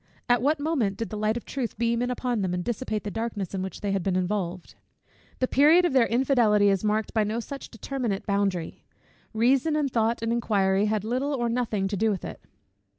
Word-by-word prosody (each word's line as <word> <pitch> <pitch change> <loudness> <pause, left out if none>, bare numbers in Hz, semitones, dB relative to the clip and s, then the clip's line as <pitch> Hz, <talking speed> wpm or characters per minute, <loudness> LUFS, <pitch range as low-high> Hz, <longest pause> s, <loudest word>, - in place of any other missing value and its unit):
At 245 -2 +3
what 290 +4 +2
moment 275 -11 0
did 230 +1 -4
the - - -4
light 215 +2 0
of 240 - -8
truth 255 -6 -4
beam 235 +1 +1
in 245 - 0
upon 245 -3 -1
them, 180 -2 -1
and 180 - -3
dissipate 220 -1 -3
the 205 - -4
darkness 225 -5 -4
in 190 - -2
which 190 0 -6
they 205 - -1
had 195 -1 0
been 185 +1 -1
involved? 185 -1 -2 0.6
The 255 - 0
period 310 +8 +5
of 345 - 0
their 255 -3 +4
infidelity 230 -5 +3
is 195 -1 +1
marked 215 0 0
by 220 - +2
no 215 +3 -2
such 275 +4 -7
determinate 235 -4 -3
boundary. 200 -4 -1 0.5
Reason, 255 +7 +2
and 290 -3 0
thought, 230 0 +1
and 230 0 0
inquiry 200 -4 +1
had 210 -1 0
little 260 +6 -1
or 240 -2 -1
nothing 230 -5 -1
to 200 - -3
do 220 +3 +2
with 195 -4 -2
it. - - -8
225 Hz, 215 wpm, -26 LUFS, 200-250 Hz, 0.6 s, period